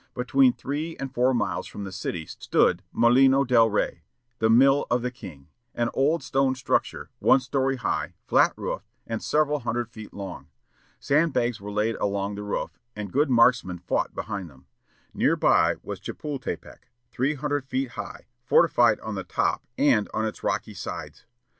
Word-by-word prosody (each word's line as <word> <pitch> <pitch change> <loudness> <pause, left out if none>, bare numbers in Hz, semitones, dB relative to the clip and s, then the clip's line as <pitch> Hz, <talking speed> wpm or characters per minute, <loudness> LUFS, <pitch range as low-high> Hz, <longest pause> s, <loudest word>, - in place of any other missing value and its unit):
Between 125 +1 +4
three 150 +6 -4
and 135 -1 -6
four 125 +1 +3
miles 120 - -1
from 100 - -7
the 95 - -6
city 90 -3 -4
stood 90 +2 +1
Molino 130 +3 +5
del 120 -3 +4
Rey, 105 -5 -1 0.4
the 110 - +2
"mill 135 +5 +5
of 120 0 +1
the 125 - -2
King," 80 - -12 0.3
an 120 0 0
old 145 +3 +1
stone 135 -1 +1
structure, 130 - -1
one - - +5
story 135 +1 0
high, 120 -7 -2
flat - - +4
roofed, - - -5 0.2
and 115 -1 -4
several 150 -1 +1
hundred 120 -1 -3
feet 110 -2 -10
long. 95 -2 -8 0.5
Sandbags 140 -6 +1
were 105 +1 -6
laid 105 +2 0
along 100 0 -1
the 100 - -6
roof, 105 0 -4 0.2
and 105 -3 -6
good 145 +1 +2
marksmen 115 -7 +3
fought 90 - -2
behind 100 -5 -5
them. 65 -2 -20 0.5
Near - - +2
by - - +3
was - - -6
Chepultepec, 145 -3 -6 0.2
three 135 +4 0
hundred 145 -1 -2
feet 130 0 -1
high, - - -8 0.2
fortified - - +4
on - - -5
the - - -4
top - - -1
and 125 -8 +3
on 110 - 0
its 110 - -5
rocky - - -2
sides. - - -7
120 Hz, 165 wpm, -25 LUFS, 105-135 Hz, 0.5 s, Molino